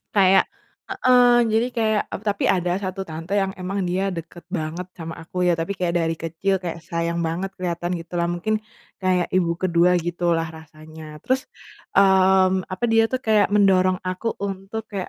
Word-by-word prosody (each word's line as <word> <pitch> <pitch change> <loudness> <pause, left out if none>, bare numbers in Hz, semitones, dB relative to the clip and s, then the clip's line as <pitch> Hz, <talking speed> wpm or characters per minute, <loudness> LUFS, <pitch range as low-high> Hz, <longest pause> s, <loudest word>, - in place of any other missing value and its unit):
Kayak 195 -1 +5 0.4
heeh, 245 -1 +4
jadi 225 +2 +2
kayak 220 -3 +1
eb - - -4
tapi 200 -1 -1
ada 180 -1 +2
1 190 -1 -5
tante 165 +3 -7
yang 190 -1 -2
emang 190 +2 -3
dia 190 +2 0
deket 170 0 -8
banget 160 +3 -3
sama 165 -2 -8
aku 170 +2 -6
ya, 175 - +3
tapi 165 +4 -2
kayak 180 -3 -2
dari 165 -1 +1
kecil 165 +4 -2
kayak 170 -2 -6
sayang 170 0 -2
banget, 170 +4 -2
kelihatan 175 -1 -2
gitu 170 +1 -10
lah, 170 - 0
mungkin 195 +5 -1 0.4
kayak 185 -2 +1
Ibu 175 -2 +2
ke-2 180 0 +3
gitu 175 0 0
lah 165 - 0
rasanya. 155 0 -12
Terus, 260 +1 0 0.5
mmm, 190 -1 +4
apa, 185 +5 -4
dia 225 0 +4
tuh 260 - -1
kayak 215 -2 +3
mendorong 190 -2 +3
aku 185 +5 -3
untuk 195 +3 -5
kayak, 195 -2 -4
185 Hz, 175 wpm, -22 LUFS, 170-195 Hz, 0.5 s, Kayak